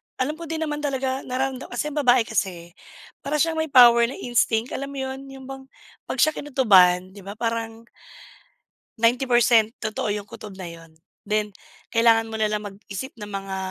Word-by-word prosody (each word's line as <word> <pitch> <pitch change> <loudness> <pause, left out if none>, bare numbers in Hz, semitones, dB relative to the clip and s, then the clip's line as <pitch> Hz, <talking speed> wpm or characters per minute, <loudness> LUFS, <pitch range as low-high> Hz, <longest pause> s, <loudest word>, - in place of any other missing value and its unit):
Alam 300 +5 -2
ko 335 - -7
din 320 0 -3
naman 295 -1 -3
talaga 265 -2 -2
nararamdaman 260 +1 -3
kasi 300 - -2
yung 300 - -2
babae 250 -3 +4
kasi 180 -6 -3 0.5
para 290 +2 -3
siyang 320 +1 +1
may 315 - 0
power 235 -3 +7
na 265 - -7
instinct, 235 -1 0
alam 275 +1 -4
mo 280 0 -9
yun, 265 +1 -6
yung 270 -1 -11
bang 270 0 -9 0.4
'pag - - -4
siya 310 - +4
kinutuban 190 -11 +3
'di 200 - -13
ba 200 +2 -9
parang 230 0 -3 1.2
90% 240 -2 +3
totoo 220 0 -2
yung 205 - -5
kutob 205 -3 -10
na 185 -2 -7
yun, 165 -1 -15 0.3
then 210 0 0 0.4
kailangan 225 -1 +3
mo 220 - -4
nalang 210 -1 0
mag-isip 205 +5 -8
ng 210 - -7
mga 195 -1 -5
235 Hz, 175 wpm, -23 LUFS, 210-270 Hz, 1.2 s, power